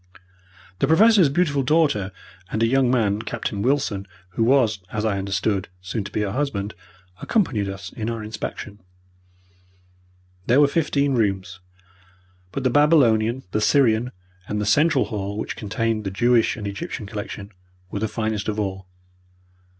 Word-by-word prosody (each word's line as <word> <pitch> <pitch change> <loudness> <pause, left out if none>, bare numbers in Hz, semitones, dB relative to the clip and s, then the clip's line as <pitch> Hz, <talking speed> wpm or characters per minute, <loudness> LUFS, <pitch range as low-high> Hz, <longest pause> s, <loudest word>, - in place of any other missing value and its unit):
The - - +2
Professor's 195 0 +6
beautiful 145 -2 +1
daughter 140 - +2 0.4
and 110 - 0
a - - +5
young 130 +1 +3
man, 110 -4 +1
Captain 110 -2 -4
Wilson, 115 -6 0 0.2
who 95 +5 -1
was, 115 -4 +3
as 105 0 -2
I 100 -3 0
understood, 100 0 -1
soon 95 +3 -4
to 100 - -7
be - - -1
her 100 -2 -1
husband, 110 -6 -2 0.5
accompanied 125 - 0
us 95 0 -7
in 110 0 -3
our 115 -2 -4
inspection. 105 -1 -6 1.7
There 125 +4 +5
were 145 - +6
fifteen 145 -2 +1
rooms, 95 -5 -1 0.9
but 135 - -4
the 130 - +2
Babylonian, 130 -5 +4
the 105 - 0
Syrian, 120 -1 +3 0.4
and 105 - -2
the 105 - -1
central 145 +5 +3
hall, 100 -2 -4
which 110 - -4
contained 110 +1 -2
the 95 - -2
Jewish 120 +5 +2
and 105 - -6
Egyptian 100 +1 -5
collection, 105 0 -7 0.4
were 100 - -3
the 110 - 0
finest 110 -1 -2
of 110 0 -2
all. 95 -2 -3
110 Hz, 150 wpm, -23 LUFS, 100-135 Hz, 1.7 s, Professor's